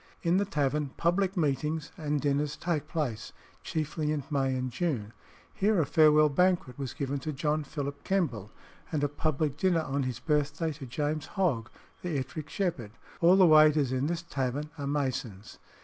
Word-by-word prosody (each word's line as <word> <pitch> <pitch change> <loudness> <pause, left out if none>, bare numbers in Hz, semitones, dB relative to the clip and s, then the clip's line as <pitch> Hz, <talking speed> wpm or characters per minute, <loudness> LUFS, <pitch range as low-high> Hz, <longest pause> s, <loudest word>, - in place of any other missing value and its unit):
In 170 +1 +3
the 200 - +2
tavern 145 -4 0
public 185 +3 +1
meetings 150 0 -1
and 150 -1 -1
dinners 145 +1 0
take 155 -4 -2
place, 135 -10 -3 0.3
chiefly 155 -1 -2
in 150 -2 -1
May 135 -2 +1
and 130 0 -2
June. 120 -7 -2 0.4
Here 205 0 +2
a 160 - +3
farewell 155 0 +5
banquet 175 -3 +1
was 135 -3 -4
given 140 0 -2
to 155 +4 -4
John 150 +2 -1
Philip 145 -1 -5
Kemble, 125 - -1 0.4
and 150 -3 -1
a - - +4
public 145 0 -1
dinner 170 -2 +2
on 140 -1 -1
his 130 -3 -2
birthday, 150 +3 0
to 140 -2 -9
James 150 +4 -2
Hogg, 135 - 0 0.3
the 170 -5 -2
Ettrick 145 +2 -5
Shepherd. 145 - -2 0.3
All 175 +2 +6
the 190 -1 +7
waiters 155 -4 +6
in 130 +2 0
this 170 +1 -2
tavern 140 0 -3
are 140 -3 -5
Masons. 130 -8 -3
150 Hz, 170 wpm, -29 LUFS, 135-160 Hz, 0.4 s, the